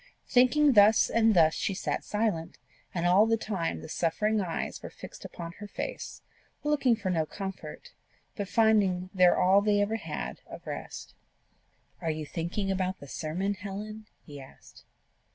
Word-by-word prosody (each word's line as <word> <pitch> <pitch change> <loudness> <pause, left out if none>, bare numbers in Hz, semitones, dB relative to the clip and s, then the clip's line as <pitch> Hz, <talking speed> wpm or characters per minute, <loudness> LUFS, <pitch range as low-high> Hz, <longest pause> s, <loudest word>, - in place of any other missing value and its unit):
Thinking 280 +4 +5
thus 210 0 +6
and 225 -2 +4
thus 160 -2 +5
she 195 - -2
sat 190 - -2
silent; 205 -6 -2 0.3
and 170 -1 -2
all 190 +5 +5
the 225 0 +2
time 170 - -3
the 80 - -9
suffering 210 +6 0
eyes 170 -4 -4
were - - -7
fixed - - -11
upon 170 -1 -7
her 205 - -7
face, - - -6 0.4
looking 290 -5 +3
for 200 -4 -3
no 165 -3 +1
comfort, 195 +1 -7 0.4
but 205 -3 -4
finding 200 -5 +2
there 180 -2 +5
all 190 +2 +5
they 205 0 +2
ever 210 +2 +1
had - - -6
of - - -10
rest. - - -7 0.9
"Are 165 - -1
you 155 -1 -3
thinking 175 +6 -3
about 185 0 -1
the 140 - -11
sermon, 170 +8 -2
Helen?" 210 +2 -7 0.2
he 145 -2 -10
asked. 135 - -16
195 Hz, 160 wpm, -29 LUFS, 175-215 Hz, 0.9 s, thus